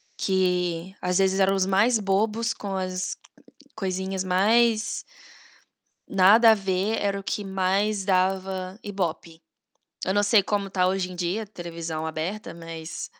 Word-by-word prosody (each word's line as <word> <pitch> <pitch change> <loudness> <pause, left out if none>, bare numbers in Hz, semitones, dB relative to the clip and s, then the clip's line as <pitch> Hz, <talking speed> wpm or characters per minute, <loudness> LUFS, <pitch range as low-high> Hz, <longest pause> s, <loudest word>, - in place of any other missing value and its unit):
que, 180 -2 0
às 180 +1 0
vezes, 190 0 +2
eram 195 0 +3
os 190 -1 +1
mais 205 +5 +3
bobos, 215 +3 0
com 200 -3 -5
as 185 -1 -3 0.6
coisinhas 190 -1 -3
mais 220 +4 +2 1.1
nada 205 +4 +6
a - - +7
ver, 195 +2 -1
era 200 -1 0
o - - -10
que 205 - -3
mais 195 +1 0
dava 190 0 0
IBOPE. 170 -4 -4 0.6
Eu 190 - 0
não 205 +1 +2
sei 205 0 +4
como 200 -1 -1
tá 185 -1 +1
hoje 185 -1 -1
em - - -8
dia 180 +5 -2
televisão 170 -5 -6
aberta, 160 +7 -4
mas 165 -1 -7
190 Hz, 140 wpm, -25 LUFS, 180-205 Hz, 1.1 s, a